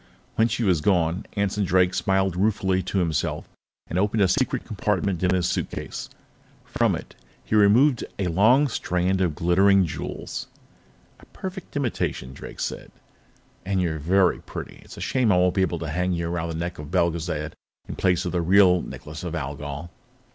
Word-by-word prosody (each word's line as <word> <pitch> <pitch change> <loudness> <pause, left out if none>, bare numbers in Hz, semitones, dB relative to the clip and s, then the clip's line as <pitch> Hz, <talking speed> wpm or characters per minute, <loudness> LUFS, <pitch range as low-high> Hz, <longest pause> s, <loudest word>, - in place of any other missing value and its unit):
When 110 - +3
she 115 +1 -2
was 90 -7 +2
gone, 85 -1 +1
Anson 100 0 0
Drake 90 0 +3
smiled 95 0 +1
ruefully 95 -1 +1
to 95 +2 -3
himself 85 -6 -1 0.4
and 90 - -2
opened 105 +1 +2
a - - +4
secret - - 0
compartment 95 -4 -1
in 90 0 +2
his 90 -1 +1
suitcase. - - -4 0.6
From - - +1
it, - - -9 0.3
he - - -6
removed 110 +6 +5
a 100 - -1
long 110 - +4
strand 95 -5 0
of 85 -5 +1
glittering 95 +4 +4
jewels. 80 - -5 0.7
"A - - -17
perfect 190 -3 -8
imitation," 115 - -2
Drake - - -10
said. - - -4 0.7
"And 95 0 -1
you're 85 -3 -1
very 90 +4 +3
pretty. - - -8
It's - - -13
a - - -8
shame 125 -5 +2
I 90 - +4
won't 90 0 +3
be 95 - +1
able 90 -2 0
to 80 -2 -5
hang 90 +4 0
you 85 -1 -2
around 85 -1 -2
the 80 - -4
neck 85 +1 -4
of 75 - -7
Belgezad 85 -3 -1 0.3
in - - -6
place 90 -2 +1
of 90 - -2
the 90 - 0
real 90 0 +5
Necklace 75 +2 -8
of 85 -1 -4
Algol." 75 +2 -5
90 Hz, 175 wpm, -24 LUFS, 85-100 Hz, 0.7 s, removed